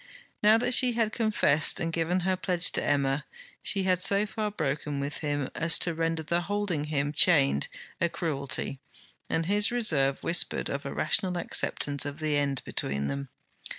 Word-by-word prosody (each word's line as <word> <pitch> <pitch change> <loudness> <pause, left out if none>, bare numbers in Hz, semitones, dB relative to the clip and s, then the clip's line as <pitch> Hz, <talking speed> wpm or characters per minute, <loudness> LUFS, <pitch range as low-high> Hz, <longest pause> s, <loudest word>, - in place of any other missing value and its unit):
Now 215 +2 +5
that 245 +2 +1
she 250 0 +5
had 225 -2 0
confessed 210 - +3
and 165 -1 -3
given 170 +3 0
her 185 +1 0
pledge 180 -1 -1
to - - -2
Emma, 140 0 0 0.4
she 195 -1 -1
had 185 -1 +1
so 200 +2 +2
far 215 0 -3
broken 150 -5 -3
with 140 +1 -4
him 145 -3 -2
as 165 -1 +3
to 170 - 0
render 165 0 -2
the 170 +3 0
holding 195 -5 -2
him 145 -1 -2
chained 140 - +4 0.3
a 170 - +2
cruelty, 140 -4 -3 0.5
and 165 0 0
his 205 +3 +2
reserve 145 - +2
whispered 170 - +1
of - - -4
a - - -5
rational 180 -3 0
acceptance 145 -4 0
of 145 0 -5
the 155 -2 -1
end 140 -3 0
between 70 +1 -2
them. 70 0 -5
165 Hz, 175 wpm, -27 LUFS, 145-190 Hz, 0.5 s, Now